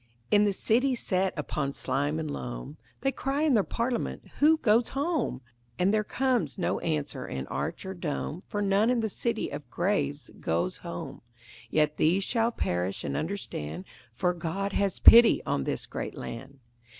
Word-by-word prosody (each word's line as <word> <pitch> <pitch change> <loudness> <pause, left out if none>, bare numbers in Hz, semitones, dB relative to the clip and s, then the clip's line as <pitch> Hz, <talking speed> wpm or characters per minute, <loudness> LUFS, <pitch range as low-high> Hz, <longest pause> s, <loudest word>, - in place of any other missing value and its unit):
In 210 0 +5
the 205 - +3
city 250 +7 +2
set 190 -4 0
upon 140 -2 -2
slime 145 +3 -1
and 155 -2 -3
loam 135 +2 -6 0.3
They 270 - +1
cry 275 +2 -1
in 310 -3 +3
their 215 -4 +4
parliament 235 +3 -3
"Who 315 +2 +6
goes 230 -3 +3
home?" 290 - 0 0.4
And 190 +3 +2
there 215 -1 +2
comes 255 +2 0
no 185 - 0
answer 145 -5 -2
in 65 0 -4
arch - - -3
or 190 - -4
dome, 170 -1 -4
For 205 0 -1
none 200 +3 +3
in 245 -2 +2
the 220 - -1
city 230 +2 -2
of 145 0 -7
graves 150 -6 -1
goes 85 - -1
home. 170 -5 -7 0.5
Yet 150 +1 +2
these 180 +5 +3
shall 230 +2 +1
perish 90 - -2
and 70 -1 -3
understand, 90 - -4 0.3
For 180 +8 +1
God 185 +4 -3
has 200 -2 0
pity 235 0 +8
on 70 - -1
this - - -2
great - - -5
land. 135 +4 -7
185 Hz, 170 wpm, -28 LUFS, 145-225 Hz, 0.5 s, pity